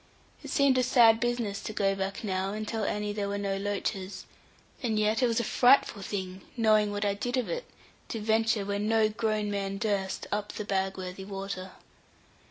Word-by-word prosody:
It - - -7
seemed 275 -3 +4
a - - +4
sad 230 -3 +6
business 240 -4 -1
to 215 - -5
go 195 -1 +2
back 195 +2 -3
now 190 -1 -1
and 215 0 -4
tell 220 -2 -2
Annie 210 0 -1
there 205 -1 -2
were 200 - -2
no 200 -1 -1
loaches; 195 -1 -3 0.6
and 225 -4 0
yet 215 +2 +2
it 250 - +4
was 230 -1 +1
a - - 0
frightful 245 -3 +4
thing, 190 -1 -4 0.2
knowing 215 -2 +4
what 205 0 -2
I 200 - +2
did 245 +5 -2
of 250 - 0
it, - - -3 0.4
to 225 - -4
venture, 220 -1 +1
where 200 0 -1
no 215 +1 +3
grown 215 -1 -1
man 195 -1 -2
durst, 200 -2 -1
up 205 0 -2
the 210 - -5
Bagworthy 190 -1 -2
water. 195 -1 -6
210 Hz, 190 wpm, -29 LUFS, 195-225 Hz, 0.6 s, sad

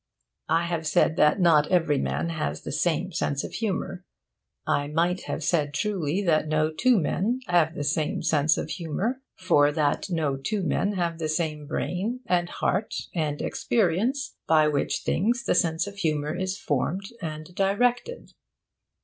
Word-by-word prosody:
I 165 +1 +3
have 165 -2 -2
said 155 +1 +3
that 150 +4 +4
not 160 -4 +5
every 165 -6 +2
man 170 - -1
has 150 - -3
the - - -5
same - - 0
sense 140 -1 -1
of - - -7
humour. 190 -4 -3 0.6
I 145 0 +1
might 170 +4 0
have 160 - -4
said 150 -3 0
truly 185 0 -1
that 155 -4 +2
no 155 0 +1
two 245 +9 +3
men 215 - 0
have 170 -2 +2
the 145 - -3
same 150 +1 -1
sense 155 -1 +3
of 155 - -4
humour, 200 - -2
for 145 -6 +3
that 150 +5 0
no 155 -6 0
two 195 +9 -2
men 200 +4 0
have 170 -3 -2
the 155 -1 -2
same 155 -2 -2
brain 205 - -2
and 175 -1 +1
heart 195 +4 -1 0.2
and 150 -4 -2
experience, 240 - 0
by 155 -1 +5
which 145 -2 -1
things 235 +6 +1
the - - +1
sense 165 -1 +1
of 200 0 -9
humour 155 -3 -1
is 185 +1 -2
formed 190 - -2
and 155 0 -6
directed. 245 - 0
170 Hz, 165 wpm, -26 LUFS, 155-195 Hz, 0.6 s, not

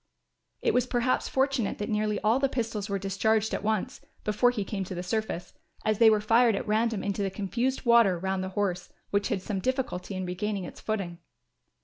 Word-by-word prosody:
It - - +2
was 250 0 +2
perhaps 250 0 +1
fortunate 265 -5 0
that 205 - -3
nearly 210 -1 0
all 220 +4 +3
the 275 0 +2
pistols 225 -5 -3
were 200 - 0
discharged 210 +3 +1
at - - -1
once, 215 -2 -1 0.2
before 210 +4 +3
he 235 -4 -2
came 195 -2 -3
to 185 - -6
the 175 - -4
surface, 180 -3 -3 0.3
as 215 -1 +1
they 230 -1 +8
were 215 -1 +4
fired 225 +1 +4
at 195 - -4
random 220 0 +1
into 200 0 -2
the 195 - 0
confused 235 +8 -2
water 235 -6 +5
round 190 +1 -2
the 190 - -3
horse, 180 -3 -1 0.2
which 200 0 +1
had 200 -6 -1
some 200 -1 -2
difficulty 225 -5 -2
in 185 0 -3
regaining 195 +2 -2
its - - -9
footing. 195 -6 -3
210 Hz, 205 wpm, -28 LUFS, 195-230 Hz, 0.3 s, they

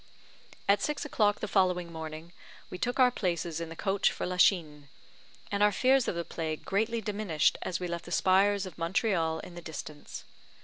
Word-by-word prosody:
At 200 0 +4
six 300 0 -2
o'clock 210 -7 +1
the 215 - -2
following 180 -3 +1
morning, 160 +1 -7 0.4
we 180 - -6
took 245 +8 -1
our 250 -1 +6
places 170 -6 -2
in 165 - -5
the 165 - -8
coach 195 +2 +1
for - - -4
Lachine, 165 -6 +2 0.6
and 200 0 -1
our 210 0 +6
fears 260 +5 +3
of - - -1
the 170 0 -3
plague 160 -2 -4
greatly 225 +3 0
diminished 200 -7 +1
as 180 - -2
we 180 - -3
left 170 0 -5
the 175 - -10
spires 195 +3 +3
of 185 - -10
Montreal 165 -2 +1
in 180 - -11
the 175 - -8
distance. 155 -2 -8
180 Hz, 185 wpm, -30 LUFS, 165-205 Hz, 0.6 s, our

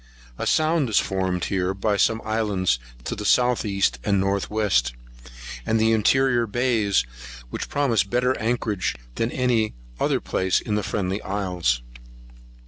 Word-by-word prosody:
A - - -2
sound 155 -4 +2
is 110 - +1
formed 95 -2 0
here 95 -1 -1
by 100 +2 0
some 110 +3 +2
islands 105 - 0 0.2
to - - -3
the 105 - -5
south 125 +3 +3
east 100 - 0
and 100 -1 +2
north 100 0 0
west, 95 - +1 0.7
and 110 - +1
interior 115 +3 +3
bays, 110 - +1 0.5
which - - -4
promises 135 -8 +2
better 125 +6 +1
anchorage 110 - -1 0.2
than 115 - -1
any 120 -4 +1 0.2
other - - +1
place 95 0 0
in 105 - -4
the 105 - +1
Friendly 95 0 -2
Isles. 90 -11 -1
105 Hz, 140 wpm, -24 LUFS, 95-115 Hz, 0.7 s, south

